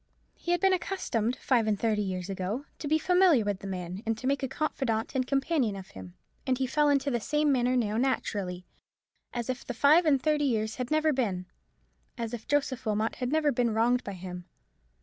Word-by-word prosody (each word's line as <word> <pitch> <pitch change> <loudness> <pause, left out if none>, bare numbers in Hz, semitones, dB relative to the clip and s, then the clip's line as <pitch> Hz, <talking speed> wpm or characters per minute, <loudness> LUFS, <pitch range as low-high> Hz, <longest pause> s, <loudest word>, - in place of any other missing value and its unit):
He - - -9
had 350 0 +3
been 385 -1 +4
accustomed, 255 - -1
five 240 -5 +1
and 210 -2 +1
thirty 215 -2 +1
years 185 -3 -3
ago, 195 +7 -3
to 295 - -4
be 310 +2 +3
familiar 360 - +4
with 205 -2 -1
the 195 - -7
man, 185 0 -5
and 225 0 -1
to 255 - -8
make 280 +2 +1
a 265 - -1
confidant 260 -5 -2
and 255 -2 0
companion 275 -5 +1
of 190 -1 -9
him, 95 -1 -11 0.3
and 255 -1 +2
he 265 - 0
fell 295 +3 +2
into 280 0 +2
the 240 - 0
same 295 +7 +1
manner 250 -1 +2
now, 220 -3 0
naturally; 200 -8 -1 0.7
as 240 -2 -4
if 255 -1 -3
the 245 - -6
five 310 +7 +5
and 280 -3 +4
thirty 300 +1 +1
years 220 -4 0
had 250 -1 -3
never 310 0 +2
been; 200 -9 -1 0.7
as 230 -1 -4
if 230 -2 -6
Joseph 280 -3 0
Wilmot 215 +1 -1
had 250 0 -2
never 305 -1 +3
been 235 -3 0
wronged 245 +3 +2
by 200 - -5
him. 180 -1 -8
245 Hz, 210 wpm, -29 LUFS, 210-285 Hz, 0.7 s, five